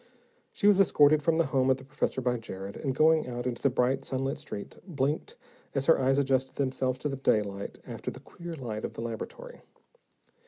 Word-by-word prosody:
She -, -, -4 dB
was 205 Hz, -1 st, +6 dB
escorted 155 Hz, -5 st, +5 dB
from 160 Hz, +2 st, +2 dB
the 165 Hz, 0 st, +3 dB
home 135 Hz, -1 st, +2 dB
of 130 Hz, -, +4 dB
the 130 Hz, -, -12 dB
professor 135 Hz, -1 st, -2 dB
by 125 Hz, -1 st, +1 dB
Jared, 100 Hz, -3 st, -7 dB
and 135 Hz, -3 st, -2 dB
going 155 Hz, +1 st, +4 dB
out 120 Hz, 0 st, -4 dB
into 125 Hz, -2 st, -3 dB
the 140 Hz, -, +4 dB
bright, 125 Hz, +1 st, +1 dB
sunlit 135 Hz, +2 st, -2 dB
street, 125 Hz, -9 st, -7 dB
blinked 155 Hz, -, -1 dB, 0.4 s
as 135 Hz, -1 st, 0 dB
her 165 Hz, -, +5 dB
eyes 135 Hz, +1 st, +3 dB
adjusted 130 Hz, -1 st, +1 dB
themselves 130 Hz, -1 st, 0 dB
to -, -, +4 dB
the 135 Hz, -1 st, -3 dB
daylight 100 Hz, -6 st, 0 dB
after -, -, -5 dB
the -, -, -9 dB
queer 170 Hz, 0 st, -9 dB
light 120 Hz, -8 st, -5 dB
of -, -, -4 dB
the -, -, -6 dB
laboratory. 120 Hz, -, -7 dB
135 Hz, 200 wpm, -29 LUFS, 125-150 Hz, 0.4 s, was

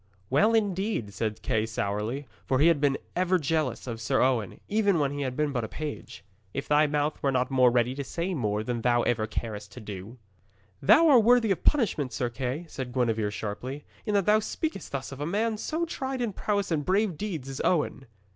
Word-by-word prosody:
'Well, 215 Hz, +12 st, +4 dB
indeed,' 195 Hz, -, 0 dB
said 110 Hz, -1 st, -2 dB
Sir -, -, -24 dB
Kay 110 Hz, 0 st, 0 dB
sourly, 110 Hz, +5 st, -2 dB, 0.2 s
for 130 Hz, -, +2 dB
he 155 Hz, +5 st, +6 dB
had 150 Hz, -4 st, +2 dB, 0.3 s
ever 185 Hz, +1 st, +2 dB
been 165 Hz, -, -7 dB
jealous 150 Hz, -5 st, 0 dB
of 115 Hz, -3 st, -5 dB
Sir 135 Hz, +4 st, +1 dB
Owen, 125 Hz, -6 st, +1 dB
even 205 Hz, -3 st, +2 dB
when 145 Hz, -3 st, +1 dB
he 145 Hz, 0 st, -4 dB
had 130 Hz, -2 st, -3 dB
been 150 Hz, -1 st, +1 dB
but 120 Hz, -4 st, -1 dB
a -, -, -3 dB
page, 150 Hz, +5 st, -7 dB, 0.3 s
'if 135 Hz, -, -3 dB
thy 150 Hz, +1 st, +4 dB
mouth 150 Hz, +1 st, -1 dB
were 140 Hz, -, +2 dB
not 130 Hz, 0 st, 0 dB
more 130 Hz, -2 st, +5 dB
ready 120 Hz, +1 st, +2 dB
to 140 Hz, +1 st, -4 dB
say 170 Hz, +7 st, -3 dB
more 105 Hz, -8 st, -1 dB
than 120 Hz, 0 st, -2 dB
thou 120 Hz, 0 st, +3 dB
ever 110 Hz, -2 st, 0 dB
carest 105 Hz, -2 st, -5 dB
to -, -, -9 dB
do.' 105 Hz, +2 st, -8 dB, 0.6 s
'Thou 320 Hz, -, +6 dB
art 255 Hz, -7 st, +7 dB
worthy 235 Hz, -2 st, +5 dB
of 180 Hz, -, -1 dB
punishment, 195 Hz, -, +2 dB
Sir 120 Hz, -3 st, -1 dB
Kay,' 130 Hz, +7 st, -3 dB
said 130 Hz, -5 st, -6 dB
Gwenevere 115 Hz, -4 st, +1 dB
sharply, 110 Hz, +7 st, -5 dB, 0.2 s
'in 210 Hz, -2 st, -1 dB
that 200 Hz, -3 st, +3 dB
thou 210 Hz, +1 st, +5 dB
speakest 220 Hz, -, -4 dB
thus 140 Hz, -1 st, -4 dB
of 135 Hz, +1 st, -8 dB
a -, -, -1 dB
man 215 Hz, +5 st, 0 dB
so 320 Hz, +10 st, -2 dB
tried 270 Hz, -5 st, -4 dB
in 235 Hz, -4 st, -1 dB
prowess 200 Hz, -1 st, -1 dB
and 155 Hz, -3 st, +1 dB
brave 190 Hz, +2 st, +1 dB
deeds 160 Hz, -6 st, -4 dB
as 135 Hz, 0 st, -5 dB
Owen.' 150 Hz, -6 st, 0 dB
140 Hz, 215 wpm, -27 LUFS, 120-195 Hz, 0.6 s, art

